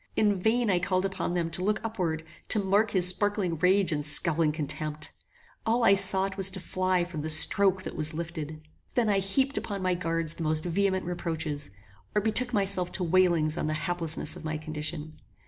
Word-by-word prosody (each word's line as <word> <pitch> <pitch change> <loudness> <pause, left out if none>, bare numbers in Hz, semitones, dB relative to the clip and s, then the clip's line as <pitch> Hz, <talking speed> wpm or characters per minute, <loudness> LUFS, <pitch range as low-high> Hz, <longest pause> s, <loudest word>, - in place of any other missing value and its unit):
In 205 -3 +1
vain 225 +2 +1
I 180 - +1
called 185 +1 -1
upon 190 -2 -3
them 165 -1 -2
to 180 +2 -1
look 210 +2 0
upward, 180 -8 -3 0.2
to - - +3
mark 205 +2 +1
his 180 -2 +5
sparkling 185 -3 0
rage 185 0 +3
and 150 -1 -2
scowling 155 +1 +4
contempt. 150 0 -5 0.5
All 230 +2 0
I 200 - +5
sought 190 0 +4
was 195 -1 +6
to 190 0 -5
fly 185 0 -1
from 175 -3 -6
the 155 - -5
stroke 190 +4 +4
that - - -7
was 155 -2 -3
lifted. 160 -2 -7 0.3
Then 235 -4 +1
I 200 -1 +2
heaped 265 +9 -1
upon 200 -2 -5
my 185 0 +1
guards 165 -2 -2
the 165 - -7
most 155 0 +1
vehement 190 +1 -1
reproaches, 160 - -4 0.5
or 210 - +2
betook 245 +3 -1
myself 195 -4 +2
to 185 - -3
wailings 170 -3 +1
on - - -2
the 155 - -2
haplessness 165 -2 -1
of 180 - -11
my 155 0 -4
condition. 155 0 -6
180 Hz, 195 wpm, -27 LUFS, 160-195 Hz, 0.5 s, was